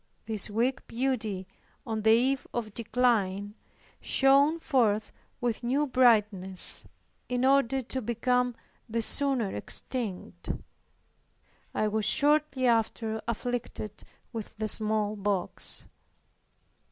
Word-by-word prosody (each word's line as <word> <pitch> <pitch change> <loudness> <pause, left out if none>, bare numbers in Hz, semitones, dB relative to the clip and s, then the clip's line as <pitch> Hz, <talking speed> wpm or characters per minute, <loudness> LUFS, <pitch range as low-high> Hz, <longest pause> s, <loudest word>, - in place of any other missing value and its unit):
This 215 -1 -2
weak 240 +5 -1
beauty, 225 -7 -2 0.4
on 220 -3 -2
the 220 - +3
eve 255 +4 +3
of 220 -4 -3
decline, 210 -4 0 0.5
shone 275 +4 +4
forth 230 -10 +1 0.3
with 240 -2 -1
new 265 +5 +1
brightness, 210 -8 +3 0.4
in 250 0 +1
order 270 -1 +3
to 260 +2 -3
become 245 +2 0 0.3
the 230 +1 0
sooner 260 -6 +2
extinct. 225 -8 -4 1.3
I 215 - +1
was 215 0 0
shortly 295 +1 +2
after 225 -1 +1
afflicted 235 -3 -4 0.3
with 220 -1 -7
the 215 0 -1
smallpox. 210 -3 -1
230 Hz, 100 wpm, -29 LUFS, 215-255 Hz, 1.3 s, shone